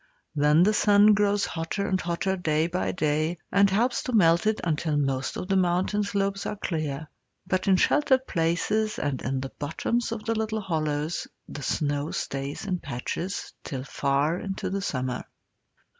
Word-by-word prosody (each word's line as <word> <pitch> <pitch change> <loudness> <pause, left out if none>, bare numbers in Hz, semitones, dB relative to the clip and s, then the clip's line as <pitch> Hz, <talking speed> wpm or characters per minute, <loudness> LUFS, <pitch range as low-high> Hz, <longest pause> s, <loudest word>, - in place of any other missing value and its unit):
Then 150 +3 +5
the 210 +3 +4
sun 210 0 +6
grows 205 0 +2
hotter 170 +5 -3
and 185 -1 0
hotter 175 +2 -1
day 160 -3 +1
by 175 +2 -1
day, 155 +1 0
and 200 0 +5
helps 235 +6 +1
to 255 - -4
melt 170 -2 +4
it 215 0 +1
until 155 -2 0
most 135 -2 -1
of 180 - -4
the 195 - +1
mountain 185 +3 +2
slopes 200 -1 -1
are - - -3
clear; 155 -6 -3 0.4
but 185 +1 -1
in 195 - +6
sheltered 260 +5 +3
places 195 +5 0
and 140 -3 -2
in 130 +1 -2
the 135 - -5
bottoms 225 +11 -1
of 220 -2 -5
the 225 - +1
little 220 -1 -1
hollows 155 -3 -2 0.2
the 145 - -7
snow 145 +2 -1
stays 140 +6 -4
in 185 -3 -1
patches 170 +11 -4
till 130 -3 -5
far 140 +4 0
into 195 -1 -4
the 195 +1 -1
summer. 130 -8 -2
175 Hz, 170 wpm, -26 LUFS, 150-200 Hz, 0.4 s, sun